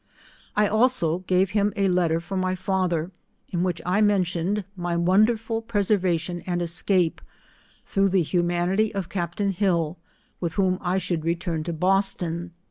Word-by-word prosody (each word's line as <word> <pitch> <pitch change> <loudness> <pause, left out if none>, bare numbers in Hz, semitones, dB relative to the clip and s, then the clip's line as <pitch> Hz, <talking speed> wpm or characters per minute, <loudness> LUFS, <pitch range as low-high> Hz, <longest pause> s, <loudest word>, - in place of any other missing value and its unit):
I 210 - +4
also 215 -6 +2
gave 185 +1 +2
him 205 0 +1
a 200 -1 +2
letter 175 -3 +2
for 175 +3 -6
my 185 0 0
father, 185 -3 -1 0.4
in 175 - -1
which 180 -2 -1
I 185 +4 +2
mentioned 195 -1 +1
my 175 -2 -2
wonderful 220 +6 +2
preservation 185 -6 0
and 175 -1 0
escape, 175 0 +1 0.6
through 195 0 +2
the 185 -2 +2
humanity 175 +5 +1
of 190 -3 -3
captain 175 +2 -1
Hill, 175 -4 0 0.4
with 170 -2 -2
whom 185 -1 +1
I 180 +1 0
should 175 -4 -1
return 165 -1 -1
to 170 - -2
Boston. 180 -1 0
180 Hz, 145 wpm, -25 LUFS, 170-195 Hz, 0.6 s, I